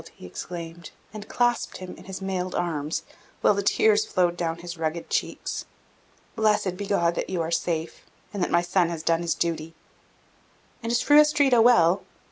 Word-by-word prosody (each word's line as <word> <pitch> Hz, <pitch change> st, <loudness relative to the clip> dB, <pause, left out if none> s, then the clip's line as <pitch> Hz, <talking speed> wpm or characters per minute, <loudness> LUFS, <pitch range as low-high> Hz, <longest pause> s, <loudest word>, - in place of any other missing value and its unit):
he -, -, -12 dB
exclaimed, 165 Hz, -, -7 dB, 0.2 s
and 215 Hz, -1 st, -9 dB
clasped 240 Hz, -1 st, 0 dB
him 185 Hz, -1 st, -8 dB
in -, -, -14 dB
his 190 Hz, 0 st, -7 dB
mailed 185 Hz, -1 st, -2 dB
arms, 155 Hz, -3 st, -2 dB, 0.4 s
while -, -, +5 dB
the 200 Hz, -, -1 dB
tears 210 Hz, +1 st, +3 dB
flowed 175 Hz, -1 st, +1 dB
down 165 Hz, -2 st, -2 dB
his 175 Hz, +1 st, -7 dB
rugged 165 Hz, 0 st, -4 dB
cheeks. -, -, -2 dB, 0.7 s
"Blessed 210 Hz, -4 st, +1 dB
be 200 Hz, +1 st, -5 dB
God 170 Hz, -4 st, +2 dB
that -, -, -3 dB
you 185 Hz, -, -2 dB
are 165 Hz, -, -4 dB
safe, 165 Hz, -1 st, -2 dB, 0.3 s
and 200 Hz, -, -3 dB
that -, -, +1 dB
my 170 Hz, 0 st, +3 dB
son 175 Hz, -1 st, +2 dB
has 165 Hz, -2 st, -5 dB
done 165 Hz, 0 st, +2 dB
his 170 Hz, -1 st, -1 dB
duty!" 165 Hz, -1 st, -2 dB, 1.1 s
"And 230 Hz, 0 st, -3 dB
is 235 Hz, -, +2 dB
Fru 295 Hz, 0 st, +6 dB
Astrida 285 Hz, -5 st, +4 dB
well?" 190 Hz, -6 st, +5 dB
175 Hz, 180 wpm, -25 LUFS, 170-205 Hz, 1.1 s, Fru